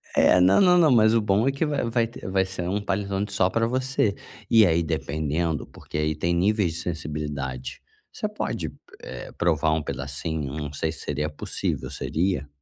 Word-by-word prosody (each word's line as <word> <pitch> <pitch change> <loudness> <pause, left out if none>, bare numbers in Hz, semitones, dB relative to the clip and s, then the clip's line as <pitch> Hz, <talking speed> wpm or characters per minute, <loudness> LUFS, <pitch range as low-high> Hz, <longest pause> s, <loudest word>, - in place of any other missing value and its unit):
É, - - +5
não 95 +2 +5
não 180 -2 +6
não, 160 -4 +5
mas 110 -2 +5
o 115 - +4
bom 105 +3 +2
é - - +4
que 140 +4 -1
vai 150 -2 -1
vai 115 0 +1
ter 115 - -10
vai 95 0 +2
ser 95 -2 -5
um 100 +3 -1
panetone 100 0 -1
só 95 -1 +2
pra 115 +4 +1
você. 130 -4 0 0.3
E 115 -2 +7
aí, 85 -2 +3
dependendo, 80 +1 -1
porque - - -8
aí 75 0 0
tem 85 +3 0
níveis 95 0 +2
de 80 - -5
sensibilidade, 75 -6 -4 0.3
você - - -3
pode, - - -3 0.3
eh, - - -8
provar 80 -2 +1
um 80 -1 -1
pedacinho. 70 +1 -4
Não 75 -1 -5
sei - - -1
se - - -8
seria 75 +1 -2
possível, 75 - -3
seria? 80 -4 -1
90 Hz, 190 wpm, -25 LUFS, 75-105 Hz, 0.3 s, E